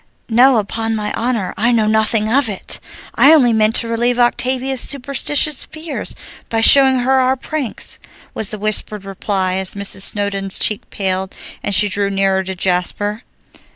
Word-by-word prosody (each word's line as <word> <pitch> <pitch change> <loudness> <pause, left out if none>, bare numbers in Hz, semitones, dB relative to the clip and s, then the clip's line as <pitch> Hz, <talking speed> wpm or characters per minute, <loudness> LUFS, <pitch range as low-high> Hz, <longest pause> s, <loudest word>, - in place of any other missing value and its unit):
"No, 245 +3 +4
upon 225 +2 -2
my 210 -1 -3
honor, 230 -5 -2
I 235 +3 +1
know 225 -3 +2
nothing 215 0 +1
of 250 +1 +2
it! 195 - -4 0.3
I 285 - +5
only 245 -6 +3
meant 220 +1 +2
to 230 - +2
relieve 240 +1 -1
Octavia's 255 +2 0
superstitious 280 +2 0
fears 315 0 -6 0.3
by 225 - -1
showing 265 +2 +6
her 265 +2 +2
our 260 0 +1
pranks" 275 -2 -5 0.3
was 215 - -1
the 215 - -3
whispered 210 -1 -1
reply 190 -1 -2
as 190 0 -2
Mrs. 200 -1 -1
Snowdon's 200 -1 +2
cheek 210 - -1
paled, 190 -1 -3 0.3
and 205 - 0
she 210 - +4
drew 200 0 -1
nearer 195 -1 0
to 190 0 -5
Jasper. 190 +4 -2
220 Hz, 160 wpm, -16 LUFS, 200-250 Hz, 0.3 s, showing